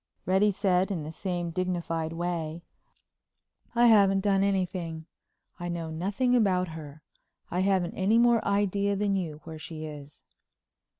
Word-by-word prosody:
Reddy 190 Hz, +3 st, +3 dB
said 190 Hz, -1 st, +1 dB
in 175 Hz, -6 st, -3 dB
the 155 Hz, -, -6 dB
same 175 Hz, 0 st, -3 dB
dignified 170 Hz, -2 st, -2 dB
way: 170 Hz, -1 st, -3 dB, 1.1 s
"I 240 Hz, +1 st, +5 dB
haven't 200 Hz, -4 st, +5 dB
done 195 Hz, -1 st, +2 dB
anything. 180 Hz, -5 st, -1 dB, 0.5 s
I 175 Hz, 0 st, -4 dB
know 165 Hz, -2 st, -4 dB
nothing 200 Hz, +10 st, 0 dB
about 185 Hz, -6 st, +2 dB
her. 155 Hz, -2 st, -10 dB, 0.5 s
I 180 Hz, -, -1 dB
haven't 190 Hz, -2 st, +1 dB
any 200 Hz, +4 st, +2 dB
more 235 Hz, -1 st, +4 dB
idea 200 Hz, 0 st, +1 dB
than 200 Hz, 0 st, 0 dB
you 160 Hz, -5 st, -3 dB
where 160 Hz, -1 st, -8 dB
she 155 Hz, 0 st, -7 dB
is." 145 Hz, -1 st, -10 dB
180 Hz, 140 wpm, -28 LUFS, 165-200 Hz, 1.1 s, I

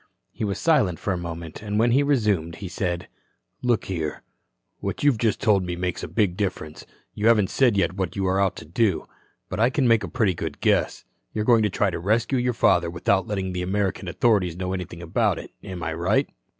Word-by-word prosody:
He -, -, -6 dB
was 100 Hz, -2 st, -1 dB
silent 130 Hz, -, +2 dB
for 100 Hz, -, -2 dB
a -, -, -2 dB
moment, 85 Hz, -2 st, -7 dB
and 105 Hz, 0 st, -3 dB
when 115 Hz, +2 st, +3 dB
he 135 Hz, +4 st, +4 dB
resumed, 105 Hz, -, +1 dB
he 95 Hz, -, -7 dB
said: 90 Hz, -1 st, -3 dB, 0.5 s
"Look 120 Hz, -3 st, +1 dB
here. 80 Hz, -5 st, -4 dB, 0.6 s
What -, -, -4 dB
you've 140 Hz, -6 st, +3 dB
just 115 Hz, -3 st, +1 dB
told 100 Hz, -4 st, +3 dB
me 90 Hz, -1 st, -3 dB
makes 90 Hz, 0 st, -3 dB
a -, -, -4 dB
big 100 Hz, -6 st, +1 dB
difference. 90 Hz, -6 st, -4 dB, 0.3 s
You 105 Hz, +2 st, 0 dB
haven't 105 Hz, -4 st, +4 dB
said 120 Hz, -6 st, +3 dB
yet 85 Hz, -2 st, +2 dB
what 95 Hz, -2 st, -2 dB
you 95 Hz, -1 st, -1 dB
are 95 Hz, +1 st, +2 dB
out 95 Hz, -1 st, +1 dB
to -, -, -9 dB
do. 95 Hz, +3 st, 0 dB, 0.4 s
But -, -, -5 dB
I 115 Hz, +3 st, +4 dB
can 130 Hz, -1 st, +1 dB
make 115 Hz, -2 st, +4 dB
a -, -, -3 dB
pretty 95 Hz, +3 st, +1 dB
good -, -, -5 dB
guess. -, -, +1 dB, 0.3 s
You're 105 Hz, -1 st, -1 dB
going 115 Hz, -2 st, +5 dB
to 105 Hz, -, +2 dB
try 100 Hz, +1 st, +1 dB
to -, -, -4 dB
rescue 110 Hz, +8 st, +1 dB
your 125 Hz, 0 st, +1 dB
father 90 Hz, -6 st, +3 dB
without 90 Hz, +3 st, +1 dB
letting 95 Hz, -3 st, -2 dB
the 90 Hz, -, -2 dB
American 95 Hz, 0 st, -1 dB
authorities 95 Hz, -4 st, +1 dB
know 90 Hz, 0 st, -3 dB
anything 90 Hz, -2 st, -6 dB
about 80 Hz, -, +1 dB
it. -, -, -9 dB
Am 90 Hz, -2 st, -6 dB
I 80 Hz, -, -2 dB
right?" 95 Hz, -, +1 dB
95 Hz, 220 wpm, -24 LUFS, 90-110 Hz, 0.6 s, going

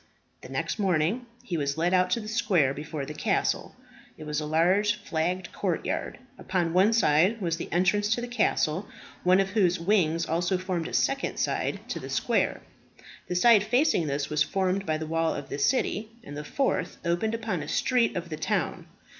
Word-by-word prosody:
The -, -, -11 dB
next -, -, -3 dB
morning 195 Hz, +5 st, +1 dB, 0.2 s
he 180 Hz, -8 st, -3 dB
was 140 Hz, 0 st, -1 dB
led 175 Hz, +3 st, +1 dB
out 185 Hz, 0 st, +3 dB
to 205 Hz, -, +1 dB
the 215 Hz, -, -8 dB
square 195 Hz, -, +2 dB
before 150 Hz, 0 st, -5 dB
the 150 Hz, -, -7 dB
castle. -, -, -1 dB, 0.4 s
It -, -, -9 dB
was 150 Hz, -1 st, -2 dB
a 150 Hz, -, -4 dB
large 185 Hz, +7 st, +3 dB
flagged 180 Hz, -2 st, -2 dB
courtyard. -, -, -2 dB, 0.2 s
Upon 175 Hz, -3 st, -1 dB
one 190 Hz, +4 st, +5 dB
side 195 Hz, 0 st, +3 dB
was 170 Hz, -4 st, -1 dB
the -, -, -7 dB
entrance 190 Hz, +4 st, +2 dB
to 240 Hz, -, -4 dB
the 245 Hz, -, -4 dB
castle, 205 Hz, -6 st, 0 dB, 0.4 s
one 185 Hz, +1 st, +5 dB
of 195 Hz, 0 st, +1 dB
whose 185 Hz, -4 st, +2 dB
wings 170 Hz, -3 st, +2 dB
also 175 Hz, +3 st, 0 dB
formed 180 Hz, -3 st, -3 dB
a -, -, -8 dB
second 275 Hz, 0 st, 0 dB
side -, -, -1 dB
to -, -, -3 dB
the -, -, -8 dB
square. -, -, 0 dB, 0.7 s
The 180 Hz, -, -3 dB
side 215 Hz, +2 st, +6 dB
facing 245 Hz, -, +2 dB
this 140 Hz, 0 st, -1 dB
was 150 Hz, 0 st, -1 dB
formed 195 Hz, 0 st, 0 dB
by 155 Hz, -1 st, +1 dB
the 160 Hz, -, -5 dB
wall 165 Hz, +1 st, 0 dB
of 145 Hz, -, -7 dB
the 140 Hz, -, -4 dB
city, 215 Hz, -, +1 dB
and 145 Hz, -, -9 dB
the 150 Hz, -, -5 dB
fourth 270 Hz, -, -1 dB
opened 175 Hz, +7 st, 0 dB
upon 220 Hz, -7 st, -3 dB
a 145 Hz, -, -6 dB
street 240 Hz, +5 st, +1 dB
of 175 Hz, -1 st, -4 dB
the 155 Hz, -, -5 dB
town. 155 Hz, -, -2 dB
180 Hz, 195 wpm, -27 LUFS, 160-210 Hz, 0.7 s, side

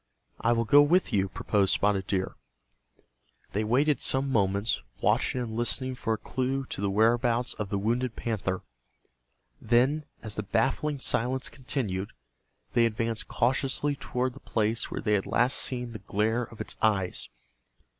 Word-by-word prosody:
"I 115 Hz, -, +2 dB
will 115 Hz, 0 st, +1 dB
go 145 Hz, +6 st, +7 dB
with 160 Hz, -1 st, +3 dB
you," 95 Hz, -1 st, +2 dB
proposed 100 Hz, 0 st, +1 dB
Spotted 100 Hz, -2 st, +1 dB
Deer. 95 Hz, -1 st, -1 dB, 1.2 s
They 105 Hz, -, -1 dB
waited 135 Hz, +7 st, +2 dB
some 135 Hz, +1 st, +2 dB
moments, 100 Hz, -1 st, +1 dB, 0.2 s
watching 130 Hz, -, +1 dB
and 110 Hz, -2 st, -4 dB
listening 130 Hz, +2 st, -1 dB
for 115 Hz, -3 st, -2 dB
a -, -, -1 dB
clue 130 Hz, +4 st, -2 dB
to -, -, -3 dB
the 100 Hz, -, +1 dB
whereabouts 115 Hz, +3 st, +2 dB
of 105 Hz, -2 st, -5 dB
the 100 Hz, -, -1 dB
wounded 115 Hz, +4 st, -1 dB
panther. 95 Hz, -5 st, -2 dB, 1.0 s
Then, 135 Hz, +6 st, +2 dB, 0.2 s
as 110 Hz, -2 st, -4 dB
the -, -, 0 dB
baffling 135 Hz, +8 st, 0 dB
silence 130 Hz, 0 st, +2 dB
continued, 110 Hz, -8 st, -3 dB, 0.6 s
they 120 Hz, -1 st, +4 dB
advanced 115 Hz, 0 st, -2 dB
cautiously 135 Hz, +3 st, 0 dB
toward 125 Hz, -1 st, -2 dB
the 140 Hz, -, -12 dB
place 110 Hz, -2 st, -1 dB
where -, -, -4 dB
they 105 Hz, -, +1 dB
had 100 Hz, -2 st, +1 dB
last 125 Hz, +3 st, +3 dB
seen 125 Hz, -2 st, 0 dB
the 110 Hz, -, -7 dB
glare 110 Hz, +4 st, 0 dB
of 115 Hz, -, -15 dB
its -, -, -3 dB
eyes. 100 Hz, -4 st, +1 dB
115 Hz, 155 wpm, -28 LUFS, 105-130 Hz, 1.2 s, go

